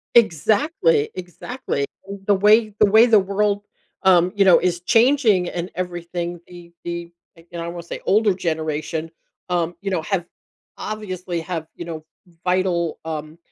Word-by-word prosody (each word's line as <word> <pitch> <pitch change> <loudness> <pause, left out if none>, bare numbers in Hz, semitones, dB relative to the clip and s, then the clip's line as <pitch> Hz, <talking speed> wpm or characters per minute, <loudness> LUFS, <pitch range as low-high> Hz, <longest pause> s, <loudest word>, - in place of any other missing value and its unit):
Exactly, 210 - +3
exactly. 180 - -4 0.2
And 195 -1 -8
the 205 - +4
way 210 +2 +4
the 210 - +7
way 220 +3 +7
the 220 -3 +6
world, 200 +1 0 0.4
um, 180 -1 +5
you 200 -1 +4
know, 185 - +8
is 175 -1 0
changing 225 -5 +3
and 175 +1 -4
everything, 175 -1 -4
the 175 -1 -13
the 170 0 -5 0.4
and 170 -1 -5
I 170 - -4
wanna 170 0 -6
say - - -7
older 210 -1 +3
generation, 160 -1 -3 0.4
um, 175 -1 0
you 195 -1 -3
know, 170 - 0
have 175 +1 -2 0.5
obviously 185 -5 -4
have, 165 -2 -5
you 170 - -7
know, 160 -2 -6 0.4
vital, 180 -2 0
um, 155 0 -5
180 Hz, 150 wpm, -22 LUFS, 170-205 Hz, 0.5 s, know